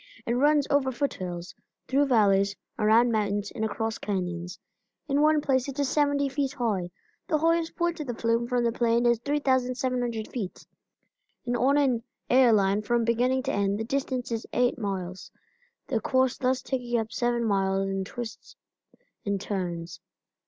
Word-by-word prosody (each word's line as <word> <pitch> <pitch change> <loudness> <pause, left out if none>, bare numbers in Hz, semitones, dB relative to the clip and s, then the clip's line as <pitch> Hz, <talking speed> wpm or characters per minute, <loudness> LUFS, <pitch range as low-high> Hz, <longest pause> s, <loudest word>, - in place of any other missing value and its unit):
It 235 - 0
runs 290 +3 +3
over 280 -2 +2
foot 280 +3 -1
hills, 175 -1 -6 0.3
through 280 +2 +2
valleys, 200 -5 +3 0.2
around 225 +3 +4
mountains, 205 -2 -1
and 220 - -4
across 225 +1 -2
canyons. 180 -3 -3 0.5
In 280 0 +2
one 305 0 +4
place 260 -2 +1
it 275 - -7
is 285 -2 +1
seventy 285 -1 +2
feet 275 0 -2
high. 210 -9 -1 0.4
The 310 - +2
highest 330 +1 +1
point 345 -1 -1
of 300 - -5
the 240 - -3
flume 230 +1 0
from 245 -1 +1
the 235 - +2
plain 235 0 +1
is 235 -1 +3
3,700 255 -4 0
feet, 205 -7 -6 0.8
and 245 0 -1
on 265 +4 +3
an 260 -5 +2 0.3
air 250 -1 +6
line, 200 -1 +3
from 235 +2 +1
beginning 250 +3 +1
to 275 - -2
end 200 0 +1
the - - -1
distance 255 0 -2
is 230 -1 -3
eight 245 +1 +2
miles, 190 -3 -4 0.6
the 230 -4 -1
course 260 +2 +2
thus 260 0 0
taking 245 -2 -1
up 225 0 -4
seven 240 -1 0
miles 195 -2 +1
in 195 0 -2
twists 230 +3 -8 0.7
and 200 -1 -1
turns. 175 -4 -4
240 Hz, 165 wpm, -27 LUFS, 205-265 Hz, 0.8 s, air